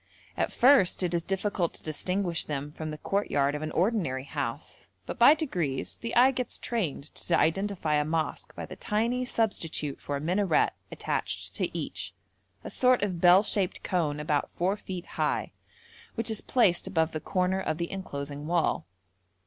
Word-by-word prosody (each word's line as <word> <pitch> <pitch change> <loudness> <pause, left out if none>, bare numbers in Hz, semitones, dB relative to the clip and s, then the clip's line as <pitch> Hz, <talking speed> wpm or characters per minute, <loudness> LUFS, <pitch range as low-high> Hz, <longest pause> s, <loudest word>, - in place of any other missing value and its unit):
At - - 0
first 250 -9 +5
it 175 -1 0
is 170 - +1
difficult 190 -1 -1
to - - -8
distinguish 175 +3 -1
them 145 0 -4
from 155 +1 -6
the 155 - -5
courtyard 145 -6 0
of 150 - -4
an 155 - -3
ordinary 175 - 0
house, 140 -1 -5 0.2
but - - -6
by 300 - +8
degrees 175 - -2
the 230 - -5
eye 255 +2 +7
gets 250 -2 -3
trained 170 - -3
to 170 - 0
identify 190 -2 +1
a 150 0 +3
mosque 160 +1 -2
by - - -5
the - - -9
tiny 235 +4 0
substitute 165 - -1
for 145 - -3
a - - -2
minaret 180 +6 +2 0.2
attached - - -3
to - - -2
each, - - -5 0.5
a - - -6
sort 255 -3 +3
of 180 -4 -2
bell 180 +2 +7
shaped 200 -3 0
cone 155 -5 0
about 150 -1 0
four 185 +3 +1
feet 185 -4 -7
high, - - -1 0.6
which 230 0 -1
is 220 - +1
placed 190 -8 +2
above 160 -4 +1
the 155 - -3
corner 185 0 0
of 155 - -2
the 170 0 -3
enclosing 145 -6 -5
wall. 160 - +1
175 Hz, 175 wpm, -28 LUFS, 150-205 Hz, 0.6 s, by